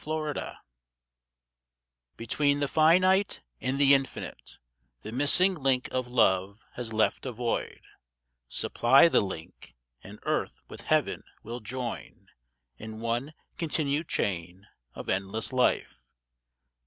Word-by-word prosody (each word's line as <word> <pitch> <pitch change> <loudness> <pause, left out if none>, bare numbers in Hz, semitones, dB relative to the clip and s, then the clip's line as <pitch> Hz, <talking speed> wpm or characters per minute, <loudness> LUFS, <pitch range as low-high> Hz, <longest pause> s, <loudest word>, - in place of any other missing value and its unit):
The 155 +1 -2
Way. 155 -2 -4 1.6
BETWEEN 145 +5 +1
the 145 - 0
finite 185 - +3 0.2
and 130 +1 -1
the 140 0 +6
infinite 135 -1 -2 0.5
The - - -7
missing 145 +9 +4
link 135 -6 +1
of 130 -1 -2
Love 100 -4 +2
has 120 -2 -5
left 110 +4 0
a - - -3
void. 120 0 -3 0.7
Supply 135 +7 +4
the - - +3
link, 80 - -8 0.3
and 100 +2 -11
earth - - -2
with - - -9
Heaven - - +1 0.2
will 120 +3 -6
join 125 +1 -6 0.5
In 110 0 -8
one 120 +6 -2 0.2
continued 155 -1 -1
chain 90 0 -3 0.3
of - - -8
endless 100 +6 -2
life. 125 - +1
125 Hz, 115 wpm, -28 LUFS, 110-145 Hz, 1.6 s, the